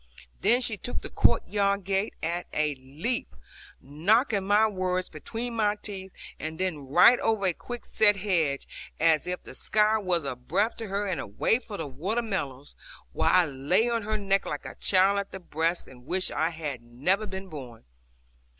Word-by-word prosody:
Then 245 +2 +4
she 225 -4 0
took 245 - -5
the - - -5
court - - +2
yard 200 -1 +1
gate 195 +3 -1
at 170 +2 -2
a 150 -1 +1
leap, 140 - -4 0.4
knocking 195 - +1
my 210 +2 +5
words 185 -3 -1
between 230 +10 -6
my 210 -2 +2
teeth, 195 -2 -8 0.3
and 160 0 -5
then 160 -7 -2
right 235 - +6
over 220 -3 +1
a 180 - +2
quick 240 +7 -8
set 205 -1 +5
hedge, 170 -8 0 0.3
as 160 0 +3
if 180 0 -3
the - - -11
sky 215 +1 +2
were 180 -6 0
a 135 - -3
breath 180 - 0
to 225 - -5
her; 200 +1 -1
and 180 -8 -2
away 105 - +1
for 220 -4 -8
the 160 - -4
water 180 - -2
meadows, 145 - -4 0.4
while - - +2
I 180 -1 +5
lay 155 - +1
on 230 -1 0
her 215 +1 -1
neck 195 -1 0
like 145 - -4
a - - -6
child 195 +1 +3
at 200 - -5
the 190 - -7
breast 165 0 -1
and 125 0 -15
wished 185 +1 0
I 160 - +1
had 155 -6 -5
never 150 - 0
been 190 0 -6
born. 130 -9 -9
185 Hz, 185 wpm, -27 LUFS, 155-210 Hz, 0.4 s, right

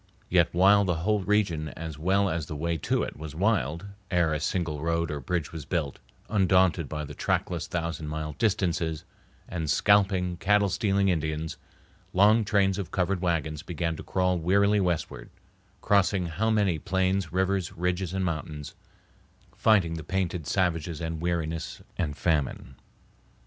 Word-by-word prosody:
While 95 +4 +5
yet - - +1
the 90 - +1
whole 105 +3 +2
region 95 -6 +1
as 80 -2 -6
well 95 +4 +2
as 80 -4 -2
the 75 - -5
way 85 +3 -1
to 80 - 0
it - - -6
was 75 -1 -8
wild, 85 - 0 0.2
ere 85 -4 +2
a 75 - -1
single 80 -2 -2
road 85 0 0
or 75 - -3
bridge 80 +4 -2
was 80 -2 -6
built, 75 -4 -2 0.3
undaunted 95 -5 +3
by 75 -1 -4
the - - -9
trackless - - -1
thousand 85 -2 -3
mile 75 0 -4
distances 85 -7 0 0.4
and 80 -4 -3
scalping, 95 0 +3
cattle 100 +3 +3
stealing 100 -1 +1
Indians, 80 -2 -2 0.6
long 105 +4 +5
trains 100 -1 +2
of 95 -4 -4
covered 90 0 0
wagons 80 -4 -1
began 85 0 -3
to - - -8
crawl 90 -1 0
wearily 100 +5 +3
westward, 90 0 -2 0.5
crossing 100 -2 +2
how 90 +7 -1
many 100 -7 +2
plains, 95 0 0
rivers, 95 0 0
ridges, 90 +1 -1
and 95 0 -1
mountains, 75 -3 -4 0.8
fighting 95 -7 +3
the 80 -1 -5
painted 90 -3 -2
savages 85 -4 0
and 80 -1 -4
weariness 85 -2 -2 0.2
and 75 -5 -2
famine. 75 -5 -1
85 Hz, 155 wpm, -27 LUFS, 80-95 Hz, 0.8 s, While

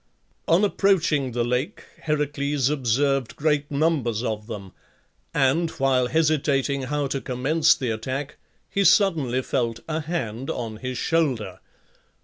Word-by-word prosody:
On 170 +5 +4
approaching 170 -10 +2
the 120 0 0
lake, 125 +4 -2 0.2
Heracles 145 -2 0
observed 135 -1 0
great 150 -1 0
numbers 140 -7 0
of 110 -3 -3
them; 100 -5 -7 0.6
and, 145 +5 +2
while 135 -5 +1
hesitating 140 -1 +1
how 145 +2 -1
to 135 0 -2
commence 145 +5 +2
the 125 -3 -2
attack, 130 +6 -4 0.3
he 200 - 0
suddenly 160 - +3
felt 120 -4 -1
a 155 0 -1
hand 135 -7 -4
on 115 -3 -4
his 130 +2 -5
shoulder. 120 - 0
135 Hz, 125 wpm, -24 LUFS, 125-155 Hz, 0.6 s, On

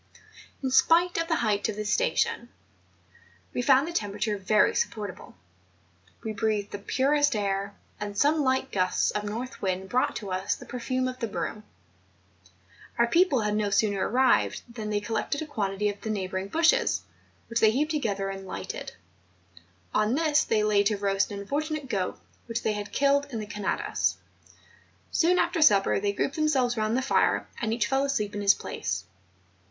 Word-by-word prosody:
In 260 - -1
spite 340 +6 +4
of 330 - -1
the 330 - +1
height 205 0 +1
of 215 - -3
this 210 0 -1
station, - - 0 1.0
we - - -1
found 270 +3 +4
the - - -4
temperature 210 - -1
very 210 +2 +3
supportable; 205 - -4 0.9
we 220 - -3
breathed 215 -2 -1
the 205 - -5
purest 280 +5 +2
air, 200 -1 -2 0.2
and 205 -1 -5
some 300 +5 +3
liglit 260 0 0
gusts 185 -2 +1
of 210 - -2
north 235 +5 -5
wind 190 0 -2
brought 255 +1 +1
to 200 -3 -5
us 185 +1 -1
the - - -12
perfume 255 +1 -2
of 255 0 -5
the 230 - -1
broom. 215 0 -4 1.3
Our 235 - +5
people 300 0 +3
had 210 -1 0
no 210 -1 0
sooner 200 -1 +1
arrived 255 +3 +2
than 215 -3 -5
they 205 -1 0
collected 225 +7 -2
a - - -6
quantity 210 -7 -2
of 205 0 -4
the 220 - -5
neighbouring 190 -2 -2
bushes, 335 - +2 0.4
which 230 0 -1
they 220 - +6
heaped 290 +8 0
together 200 -10 -1
and 195 0 -8
lighted. 95 - -6 1.0
On 215 +3 +2
this 310 0 +3
they 215 -1 +1
laid 205 -1 +3
to 210 -1 0
roast 195 0 0
an 200 0 -5
unfortunate 295 +6 -3
goat, 190 -4 -2 0.3
which 230 0 -3
they 215 - +1
had 205 -1 -5
killed 280 +1 +2
in 240 - -5
the 215 - -4
Canadas. 205 -1 -1 0.9
Soon 350 +2 +3
after 340 -1 +1
supper 200 -10 +5
they 200 0 0
grouped 270 +8 -2
themselves 270 -6 +2
round 215 +1 0
the 260 - 0
fire; 270 - +2 0.2
and 220 -2 -1
each 230 +1 +1
fell 270 0 +1
asleep 215 -7 -1
in 205 - -3
his 200 0 +5
place. 95 0 -4
220 Hz, 175 wpm, -27 LUFS, 205-270 Hz, 1.3 s, they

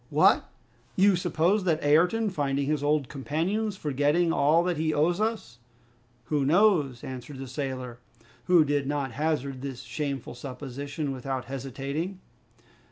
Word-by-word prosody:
"What! - - +4 0.5
you 195 0 +5
suppose 175 +3 +1
that 160 -3 +1
Ayrton 180 +9 +3
finding 140 -4 -1
his 150 0 0
old 145 -2 +1
companions, 180 - -2
forgetting 150 +4 +1
all 165 +1 +4
that 175 -2 -1
he 155 0 0
owes 170 +6 +2
us 215 - -2 0.3
" 120 0 -36
"Who 150 -2 +1
knows?" 150 - +3
answered 130 +2 -7
the 135 0 -6
sailor, 130 -2 -5 0.5
who 175 -4 +5
did 145 -1 0
not 140 -2 -1
hazard 140 -1 -2
this 135 -2 -6
shameful 140 -2 -4
supposition 140 +3 -5
without 130 0 -4
hesitating. 135 +7 -4
145 Hz, 140 wpm, -27 LUFS, 135-170 Hz, 0.5 s, you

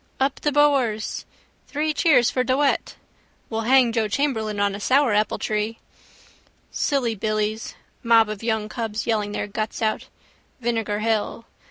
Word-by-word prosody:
—Up 270 +1 0
the 295 - +1
Boers! 270 -7 +1 0.4
—Three 305 +2 -1
cheers 265 -7 +4
for 255 - +1
De 260 +1 +1
Wet! 285 -1 0 0.6
—We'll 225 +1 -2
hang 260 -3 +5
Joe 225 -2 0
Chamberlain 220 -4 -1
on 200 -1 +1
a 200 - -5
sourapple 230 -3 +2
tree. 215 +1 -2 0.9
Silly 260 -5 0
billies: 215 +1 -2 0.3
mob 230 -2 +5
of 210 -1 -6
young 220 -2 -1
cubs 225 -1 -4
yelling 215 -3 0
their - - -2
guts 215 +1 -4
out. 220 -1 -1 0.5
Vinegar 225 -3 -1
hill. 225 +1 -1
225 Hz, 145 wpm, -23 LUFS, 215-260 Hz, 0.9 s, hang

